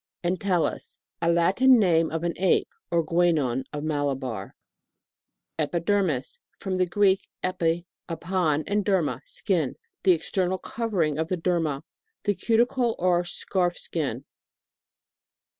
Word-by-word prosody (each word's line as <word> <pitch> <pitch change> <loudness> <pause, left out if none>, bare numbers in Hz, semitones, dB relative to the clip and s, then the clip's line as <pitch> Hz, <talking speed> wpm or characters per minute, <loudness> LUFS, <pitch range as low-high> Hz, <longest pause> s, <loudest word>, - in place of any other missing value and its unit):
ENTELLUS. 180 -1 0 0.2
Latin 180 +10 +5
name 165 -6 +3
of 165 +1 -3
an 170 -1 0
Apo, 185 -1 +3 0.3
or 170 -1 +2
Guenon 155 -7 +1
of 150 0 -5
Malabar. 135 -9 -2 1.0
EPIDERMIS. 170 -3 0 0.2
From 190 -2 -3
the 185 -1 +2
Greek, 195 +1 +2
epi, 175 -2 0 0.2
upon, 165 -3 0
and 205 0 0
derma, 190 -6 +1
skin. - - -1 0.3
The 185 -3 +5
ex 165 - -5
ternal 185 -1 0
covering 180 -12 -1
of 160 - 0
the 185 - -1
derma. 165 -5 0 0.4
The 205 - +2
cuticle 235 +2 +1
or 175 -1 +2
scarf 175 0 0
skin. 135 -5 -3
175 Hz, 120 wpm, -26 LUFS, 160-190 Hz, 1.0 s, Latin